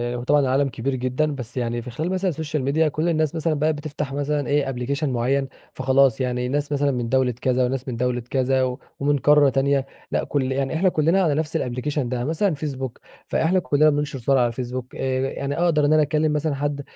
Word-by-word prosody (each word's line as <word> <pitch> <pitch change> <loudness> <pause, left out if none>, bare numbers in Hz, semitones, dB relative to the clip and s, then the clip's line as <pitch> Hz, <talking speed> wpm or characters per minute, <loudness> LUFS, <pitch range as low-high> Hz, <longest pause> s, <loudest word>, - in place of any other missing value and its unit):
هو 120 - -4
طبعًا 145 +3 +3
العالم 135 +1 +2
كبير 130 +2 -2
جدًا 130 +4 -1
بس 125 -1 -8
يعني 120 -1 -1
في 125 - -8
خلال 155 +8 -3
مثلًا 185 0 0
السوشيال 155 -3 -3
ميديا 155 +4 +2
كل 155 +3 -1
الناس 155 -1 0
مثلًا 160 0 0
بقت 155 +1 +1
بتفتح 145 -1 -5
مثلًا 145 -1 -1
إيه 145 -1 +1
أبلكيشن 135 +4 -2
معين، 130 +3 0 0.3
فخلاص 130 -1 +3
يعني 125 -1 -1
الناس 145 +3 -2
مثلًا 145 0 +1
من 120 -3 -2
دولة 130 0 +2
كذا 130 0 +2
وناس 130 +1 -3
من 125 - -3
دولة 125 0 0
كذا 130 0 +1
و 125 +1 -2 0.2
ومن 145 +1 +2
قارة 145 0 +5
تانية، 135 +1 +1 0.3
لأ - - 0
كل 135 -2 -1
يعني 135 +1 -1
إحنا 185 +4 +3
كلنا 165 +3 +2
على 155 -6 +2
نفس 155 0 -2
الأبليكيشن 125 +2 -2
ده. 125 - -2
يعني 125 +5 -2
مثلًا 180 +3 +1
فيسبوك 135 -4 -5 0.3
فإحنا 180 +4 +2
كلنا 155 -3 +3
بننشر 145 -2 -2
صور 135 +3 +2
على 120 - +3
الفيسبوك 125 +1 -5
آآ، - - -9
ي 130 0 0
يعني 140 +1 -3
أقدر 165 -4 +2
إن 150 - +3
أنا 155 - +5
أكلم 150 +1 +1
مثلًا 150 -1 0
حد 145 0 -2
140 Hz, 225 wpm, -23 LUFS, 130-150 Hz, 0.3 s, قارة